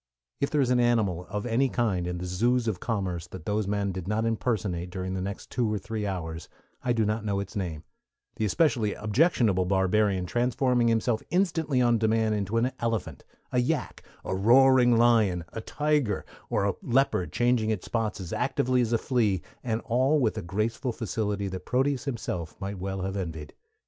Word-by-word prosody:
If 140 - 0
there 150 - +2
is 125 -2 +1
an 125 - +3
animal 105 -7 +1
of 105 +3 -3
any 125 +3 +2
kind 100 -9 0
in 90 0 -3
the 90 - -5
zoos 115 +7 +1
of 100 -5 -1
commerce 95 -7 -2
that 90 -2 -10
those 105 -1 0
men 100 -1 0
did 95 -1 -6
not 110 +2 0
impersonate 105 -6 -1
during 95 0 -4
the 95 - -2
next 100 +2 -6
two 120 -4 0
or 105 - 0
three 105 +1 -4
hours 80 -3 -5 0.3
I 125 - +1
do 115 -2 +2
not 105 +1 -1
know 100 -2 -1
its 100 +3 -6
name, 85 -6 -3 0.5
the 110 - 0
especially 115 - +2
objectionable 110 - +2
barbarian 95 0 +2
transforming 120 +3 +1
himself 115 0 +1
instantly 165 -7 +1
on 120 -2 +3
demand 110 0 +2
into 105 +1 -1
an 125 +3 +2
elephant, 105 - -2 0.3
a 125 - +2
yak, 130 +2 -1 0.2
a - - -2
roaring 120 +3 +5
lion, 110 -7 +3
a 110 - -4
tiger, 145 -7 0 0.2
or 100 - +1
a 100 - +1
leopard 120 -7 +1
changing 120 -2 +2
its 110 -4 -2
spots 110 -3 -2
as 90 -3 -6
actively 125 0 +1
as 115 -2 0
a - - +4
flea, 110 -7 0 0.2
and 115 -2 -1
all 130 +6 +2
with 115 -6 +1
a 110 - -3
graceful 110 +7 -2
facility 105 -3 -2
that 95 -1 -6
Proteus 135 +2 +1
himself 110 - -4
might 100 0 -5
well 95 +1 -3
have 95 +1 -3
envied. 80 -6 -5
110 Hz, 190 wpm, -27 LUFS, 95-120 Hz, 0.5 s, roaring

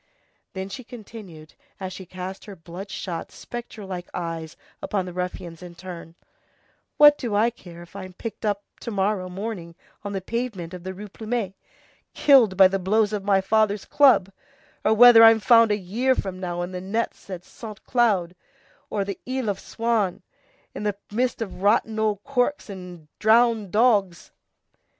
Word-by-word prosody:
Then 190 0 -4
she 255 +6 -8
continued, 210 -10 -11 0.3
as 185 -1 -5
she 190 -1 -9
cast 185 +2 -7
her 205 - -9
blood 180 +4 -9
shot, 175 -3 -5
spectre 235 -3 -8
like 180 -2 -6
eyes 165 -2 -5 0.2
upon 195 -3 -2
the 180 - -7
ruffians 180 -2 -5
in 175 -1 -10
turn:— 170 -2 -9 0.8
"What 295 0 +8
do 230 -5 -2
I 225 +3 +3
care 175 -6 -12
if 175 - -18
I'm 185 -2 -8
picked 230 +5 -7
up 205 -1 -1 0.2
to - - -6
morrow 195 -2 -1
morning 185 -3 -6 0.3
on 205 -1 -5
the 195 - -1
pavement 195 -4 -4
of 180 -1 -8
the 190 0 -6
Rue 210 +3 -8
Plumet, 215 -1 -3 0.6
killed 245 -10 +5
by 190 -1 +9
the 195 +1 -2
blows 210 +3 +2
of 205 -2 -2
my 195 -1 +3
father's 210 +1 +1
club, 260 -9 +4 0.5
or 220 - +3
whether 240 0 +9
I'm 225 0 +8
found 230 0 +5
a 205 - +2
year 230 +8 0
from 190 -5 -4
now 175 -1 -3
in 175 - -5
the 180 -1 -5
nets 205 +2 -3
at 180 -2 -6
Saint 215 0 -10
Cloud 200 -8 +1 0.5
or 200 -2 -1
the 200 -1 -5
Isle 260 -4 -1
of 195 - -6
Swans 225 -5 -1 0.5
in - - -6
the 210 -1 -1
midst 240 +1 0
of 190 -3 -9
rotten 220 +2 +2
old 210 -2 0
corks 275 -3 -1
and 180 -4 -10
drowned 225 -2 +4
dogs?" 205 -5 +2
200 Hz, 175 wpm, -24 LUFS, 185-225 Hz, 0.8 s, by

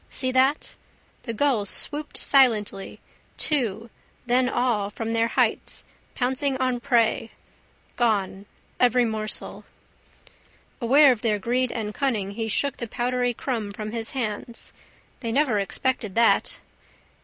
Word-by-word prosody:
See 255 -1 -1
that? 265 +3 +2 0.5
The 230 - -5
gulls 225 -5 +1
swooped 300 0 -1
silently, 215 -8 +2 0.4
two, 230 -6 -1 0.3
then 250 +1 +2
all 235 -6 0
from 225 +2 -4
their 230 0 +2
heights, - - +1 0.3
pouncing 265 +2 0
on 255 -2 0
prey. 235 -3 +1 0.7
Gone. 200 -4 0 0.3
Every 245 0 +4
morsel. 215 -1 -4 1.2
Aware 275 +4 +6
of 235 -4 -2
their 215 -3 +1
greed 245 +4 0
and 215 -2 -4
cunning 220 -8 -1
he 225 +2 -4
shook 280 +6 0
the 235 - -5
powdery 245 +1 -1
crumb 225 -6 -3
from 215 +1 -6
his 225 -1 -3
hands. 230 -2 -5 0.5
They 230 -3 -3
never 255 -4 +2
expected 215 0 -2
that. 230 0 +3
235 Hz, 125 wpm, -24 LUFS, 215-255 Hz, 1.2 s, Aware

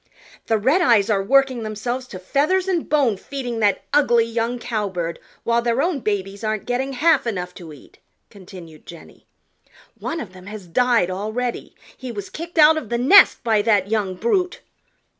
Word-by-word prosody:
"The 225 - +2
Redeyes 235 - +3
are 200 -2 +2
working 265 +3 +2
themselves 240 +4 -4
to 190 - -9
feathers 300 - 0
and 355 -4 -1
bone 275 -9 +2
feeding 245 -1 -5
that 205 -2 +1
ugly 240 -6 +4
young 230 +1 -2
Cowbird 200 -8 -3 0.2
while 235 0 +1
their 235 +1 0
own 325 0 0
babies 200 -2 -3
aren't 215 -1 -2
getting 260 +2 -2
half 300 0 +2
enough 180 -5 -4
to 170 -3 -11
eat," 145 - -16 0.3
continued 180 -5 -13
Jenny. 170 -2 -14 0.7
"One 330 - -4
of 195 - -8
them 185 0 -14
has 210 -2 -8
died 230 0 +1
already. 220 +6 -4 0.2
He 255 -2 -7
was 205 -3 -7
kicked 335 +2 -8
out 315 0 +7
of 255 -9 -5
the 235 - -1
nest 290 +12 +6
by 220 -3 +2
that 205 -3 +1
young 205 -4 -1
brute." 360 - -1
230 Hz, 170 wpm, -21 LUFS, 200-265 Hz, 0.7 s, out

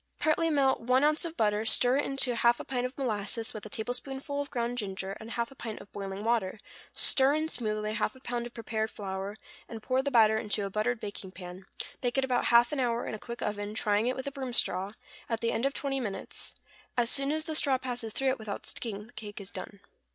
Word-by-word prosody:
= - - -46
Partly 330 +1 +3
melt 275 -3 +3
one 255 +3 +3
ounce 305 +3 +4
of 335 0 -5
butter, 210 -1 +3
stir 245 +3 +4
it 290 - +1
into 270 -2 +2
half 235 +1 +4
a - - -4
pint 250 -1 0
of 255 - -14
molasses, 225 -2 -1
with 215 -1 -6
a - - -12
tablespoonful 265 +6 -2
of 285 - -5
ground 245 -2 -1
ginger, 195 -2 -3
and 220 - -8
half 235 0 -2
a - - -13
pint 225 -4 -5
of 200 - -13
boiling 195 0 -5
water, 220 -4 +1 0.3
stir 270 +2 +4
in 310 +1 +1
smoothly 215 -6 -1
half 215 +1 0
a - - -13
pound 240 -2 -2
of 240 - -14
prepared 220 -1 -1
flour, 195 0 -4 0.3
and 225 -2 -7
pour 255 0 +2
the 280 - 0
batter 220 -4 +6
into 210 -2 0
a 195 - -4
buttered 220 +4 +1
baking 205 -2 -5
pan; 180 0 -9 0.3
bake 245 0 0
it 270 - +4
about 250 -2 +1
half 235 0 +6
an 295 - -1
hour 240 -2 +1
in - - -3
a 215 - -4
quick 235 +2 -6
oven, 205 0 -2
trying 210 +1 +2
it 255 - +1
with 260 - -4
a 280 - -2
broom 260 -3 -4
straw, 190 -4 +2 0.4
at 230 -1 0
the 230 0 +1
end 230 +5 +2
of 275 - -2
twenty 275 -1 0
minutes; 210 -6 -3 0.4
as 240 0 +3
soon 275 +1 +2
as 310 +1 -1
the 315 - -2
straw 280 -3 +5
passes 245 -3 -4
through 270 +4 +1
it 260 - 0
without 215 -2 -5
sticking, 210 -3 -4
the 240 - -18
cake 210 -1 -7
is 200 -1 -6
done. 200 -1 -7
235 Hz, 245 wpm, -30 LUFS, 210-265 Hz, 0.4 s, batter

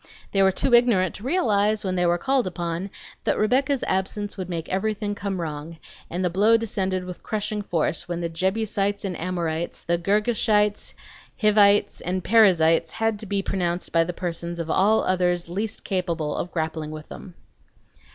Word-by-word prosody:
They 195 - +2
were 190 0 +5
too 240 +6 0
ignorant 230 -7 +4
to 210 - -10
realize, 215 - +1
when 185 -1 -1
they 180 -1 +2
were 175 0 +2
called 265 +4 +1
upon, 175 +1 -3 0.3
that - - +1
Rebecca's 265 +5 +1
absence 200 +2 -2
would 185 -2 -6
make 165 -2 -4
everything 205 +2 -1
come 200 -2 -4
wrong, 160 0 -5 0.3
and 180 +2 -2
the - - +2
blow 210 +5 +4
descended 190 -4 -2
with 180 -1 -8
crushing 215 0 -2
force 170 -4 -1
when 175 -1 -2
the 170 - -1
Jebusites 200 +3 -1
and 185 -2 -3
Amorites, 170 -2 -3
the 170 0 0
Girgashites, 210 +2 +1 0.4
Hivites, 205 -2 +4
and 185 +1 -2
Perizzites 170 -7 +4
had 225 -1 -1
to 215 - -7
be 195 0 -1
pronounced 175 -2 -2
by 165 0 +4
the 170 - -3
persons 170 -1 -4
of 165 -1 -3
all 215 +3 +3
others 180 -2 0
least 205 +5 -3
capable 170 -6 -2
of 180 - -4
grappling 160 -2 -3
with 155 0 -8
them. 180 -3 -10
190 Hz, 170 wpm, -24 LUFS, 170-210 Hz, 0.4 s, were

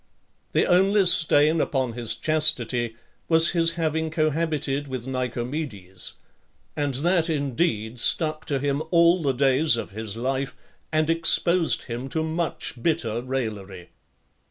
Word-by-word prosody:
XLIX. - - -43
The - - +3
only 195 +3 +3
stain 155 -2 +3
upon 130 -4 -1
his 120 -1 -2
chastity 125 -7 +1 0.3
was 165 0 +5
his 165 -1 +1
having 160 -1 -1
cohabited 155 -2 -1
with 130 -3 -5
Nicomedes; 125 - -4 0.6
and 145 -3 -1
that 170 +4 +1
indeed 135 -6 -1
stuck 155 +3 +1
to 145 -3 -1
him 140 +1 -1
all 170 +1 +4
the 140 -3 +1
days 135 +1 +3
of 115 - -5
his 110 +1 -6
life, 130 +2 -2 0.4
and 155 0 +1
exposed 165 +1 +2
him 120 +2 -6
to 160 +2 -1
much 160 -6 -3
bitter 120 -8 -1
raillery. 105 -8 -5
145 Hz, 130 wpm, -24 LUFS, 120-160 Hz, 0.6 s, was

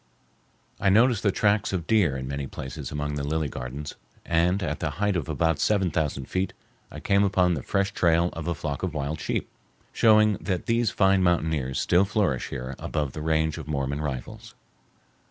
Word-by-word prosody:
I 95 - +2
noticed 115 +2 +4
the 100 - +2
tracks 105 +1 +1
of 90 -4 -2
deer 90 -10 +2
in 65 0 -5
many 70 0 -4
places 65 -1 -7
among 75 0 -3
the 70 -1 -3
lily 80 +1 -1
gardens, 65 +3 -6 0.3
and 90 +4 +2
at 75 -3 -2
the 75 - -1
height 100 0 +1
of 85 -7 -2
about 80 -1 +1
seven 95 -5 +2
thousand 75 -4 -1
feet 95 +5 -2 0.4
I - - -9
came 100 0 +2
upon 90 -2 +3
the 75 - -3
fresh 100 +8 0
trail 85 0 +2
of 85 0 -6
a 85 - 0
flock 75 -3 -4
of 90 -4 -3
wild 75 +1 -3
sheep, - - -2 0.5
showing 110 -2 +5
that 90 -3 -2
these 115 -1 +2
fine 95 0 +3
mountaineers 80 -7 +1
still 90 +3 +3
flourish 100 - 0
here 65 -1 -5
above 75 -4 -2
the 75 - -6
range 80 0 0
of 75 - -8
Mormon 70 -1 -2
rifles. 70 -5 -6
80 Hz, 190 wpm, -26 LUFS, 75-95 Hz, 0.5 s, showing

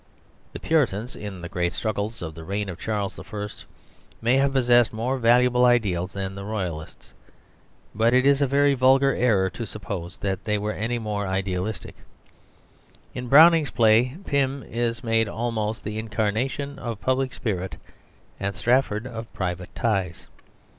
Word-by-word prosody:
The - - -6
Puritans 125 -8 0
in 100 -3 -7
the 85 - -5
great 90 -2 -1
struggles 110 -1 -3
of 80 -1 -5
the 80 +1 -10
reign 100 +3 -3
of 90 -1 -7
Charles 105 -3 -3
I. 105 -1 -5 0.7
may 120 +3 +2
have 140 0 +2
possessed 120 -3 +4
more 125 +4 -2
valuable 125 +1 +4
ideals 100 -8 +2
than 95 -1 -4
the 100 0 -7
Royalists, 90 -7 -5 0.8
but 115 +2 +2
it 130 +1 +4
is 140 0 +4
a 140 - +3
very 140 +1 +3
vulgar 135 +1 +4
error 105 -6 +2
to 115 - -6
suppose 95 -4 -6
that 95 -2 -3
they 105 -2 0
were 105 +1 -2
any 115 +3 -2
more 105 -3 -3
idealistic. 95 +2 -3 1.2
In 125 0 -5
Browning's 160 +3 +7
play 120 +5 +3
Pym 140 -1 0
is 115 0 -2
made 115 -2 +1
almost 110 -1 -2
the 105 +1 -4
incarnation 115 +6 -2
of 115 -3 -5
public 130 +1 0
spirit, 95 - -4 0.6
and 100 0 -2
Strafford 120 -3 +1
of 115 -2 -7
private 90 -1 -3
ties. 95 -8 -2
110 Hz, 155 wpm, -24 LUFS, 100-125 Hz, 1.2 s, Browning's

